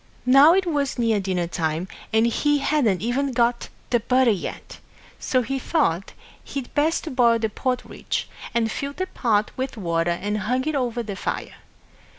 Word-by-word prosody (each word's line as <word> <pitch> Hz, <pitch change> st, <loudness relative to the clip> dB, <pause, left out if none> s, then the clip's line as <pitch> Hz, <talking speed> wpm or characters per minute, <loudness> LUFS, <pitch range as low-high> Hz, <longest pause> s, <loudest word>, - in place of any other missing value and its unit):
Now 275 Hz, +6 st, +7 dB
it 385 Hz, 0 st, +2 dB
was 290 Hz, -6 st, -1 dB
near 225 Hz, -3 st, +2 dB
dinner 185 Hz, -3 st, -1 dB
time, 165 Hz, 0 st, -2 dB, 0.2 s
and 220 Hz, +1 st, +3 dB
he 295 Hz, +5 st, +2 dB
hadn't 270 Hz, -10 st, +1 dB
even 260 Hz, +3 st, 0 dB
got 235 Hz, 0 st, +1 dB, 0.2 s
the 240 Hz, -, +4 dB
butter 250 Hz, +1 st, +3 dB
yet; 195 Hz, -, -5 dB, 0.4 s
so 255 Hz, -1 st, +1 dB
he 270 Hz, +3 st, -2 dB
thought 195 Hz, -, 0 dB, 0.3 s
he'd 275 Hz, -3 st, -6 dB
best 310 Hz, -1 st, 0 dB
boil 235 Hz, -2 st, +5 dB
the 220 Hz, -1 st, -1 dB
porridge, 250 Hz, +3 st, -3 dB, 0.2 s
and 225 Hz, -2 st, 0 dB
filled 280 Hz, +4 st, -4 dB
the 370 Hz, -, -1 dB
pot 215 Hz, -, 0 dB
with 260 Hz, -1 st, -4 dB
water 170 Hz, -3 st, 0 dB
and 205 Hz, +5 st, -1 dB
hung 250 Hz, +7 st, -1 dB
it 310 Hz, -, 0 dB
over 245 Hz, -4 st, -1 dB
the 205 Hz, -3 st, -5 dB
fire. -, -, -4 dB
240 Hz, 165 wpm, -23 LUFS, 210-275 Hz, 0.4 s, Now